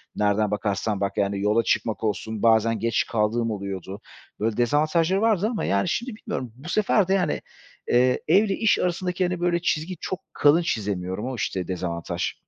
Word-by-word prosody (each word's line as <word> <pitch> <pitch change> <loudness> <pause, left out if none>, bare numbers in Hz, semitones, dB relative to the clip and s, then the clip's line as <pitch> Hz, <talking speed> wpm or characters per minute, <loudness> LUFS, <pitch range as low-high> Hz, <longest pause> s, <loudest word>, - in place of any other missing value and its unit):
nereden 105 0 +1
bakarsan 105 0 -1
bak 100 0 -2
yani 100 0 0
yola 105 +3 +2
çıkmak 110 0 -1
olsun, 110 +1 -2
bazen 115 -1 +4
geç 115 +1 +1
kaldığım 115 +1 0
oluyordu. 100 0 -5 0.4
Böyle 110 +1 -1
dezavantajları 155 - +2
vardı 215 -3 +2
ama, 215 - -2
yani, 100 0 +1
şimdi 235 -2 -2
bilmiyorum 125 - -5
bu 145 +7 -10
sefer 205 -1 +2
de, 190 - +2
yani, 180 -6 0 0.5
eee, 125 +1 +3
ev 190 +7 +5
ile 195 -2 0
iş 225 -2 +2
arasındaki, 180 +1 -1
hani, 180 -1 -2
böyle 175 -1 +1
çizgi 170 +1 -1
çok 185 - -3
kalın 150 +4 +4
çizemiyorum. 100 - -2
O 130 - -4
işte 95 -5 -3
dezavantaj. 85 -2 -3
115 Hz, 175 wpm, -24 LUFS, -, 0.5 s, ev